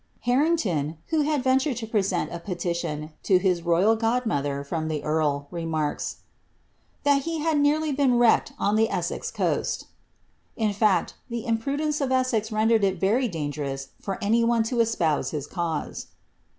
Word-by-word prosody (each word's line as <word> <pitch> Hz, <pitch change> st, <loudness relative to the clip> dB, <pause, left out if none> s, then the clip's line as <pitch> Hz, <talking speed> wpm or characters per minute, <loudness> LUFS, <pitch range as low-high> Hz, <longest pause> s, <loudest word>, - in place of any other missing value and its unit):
Harrington, 240 Hz, -, +1 dB
who 320 Hz, -1 st, +2 dB
had 295 Hz, -2 st, 0 dB
ventured 260 Hz, 0 st, +2 dB
lo 225 Hz, -, -5 dB
present 195 Hz, -5 st, 0 dB
a 170 Hz, -, -4 dB
pelition 170 Hz, -4 st, -3 dB
to 190 Hz, -, +4 dB
his 180 Hz, -2 st, +1 dB
royal 175 Hz, +6 st, +3 dB
god 230 Hz, +3 st, 0 dB
mother 140 Hz, -7 st, -1 dB
from 155 Hz, +2 st, -3 dB
the 155 Hz, -2 st, -3 dB
earl, 150 Hz, -2 st, 0 dB
remarks, 160 Hz, -3 st, -3 dB, 0.4 s
" -, -, -40 dB
that 285 Hz, -1 st, +4 dB
he 330 Hz, +3 st, -3 dB
had 315 Hz, -1 st, +1 dB
nearly 300 Hz, +2 st, +2 dB
been 270 Hz, -3 st, +2 dB
wrecked 240 Hz, -2 st, +4 dB
on 205 Hz, -, +1 dB
the 220 Hz, +1 st, +4 dB
Es^ex -, -, -3 dB
coast." -, -, -1 dB, 0.7 s
In 215 Hz, -3 st, +1 dB
fact, 200 Hz, -4 st, +2 dB, 0.2 s
tlie 235 Hz, -1 st, -4 dB
imprudence 285 Hz, +7 st, -1 dB
of 265 Hz, -2 st, 0 dB
Essex 255 Hz, -4 st, +1 dB
rendered 220 Hz, 0 st, +3 dB
it 190 Hz, -2 st, +1 dB
verydaa^r 190 Hz, -, 0 dB
ous 135 Hz, 0 st, -7 dB
for 195 Hz, -2 st, -3 dB
any 230 Hz, +3 st, +3 dB
one 230 Hz, -1 st, +2 dB
lo 245 Hz, -, 0 dB
espouse 185 Hz, -10 st, +1 dB
his 150 Hz, -3 st, -4 dB
cause. 165 Hz, -3 st, -4 dB
215 Hz, 165 wpm, -25 LUFS, 165-250 Hz, 0.7 s, to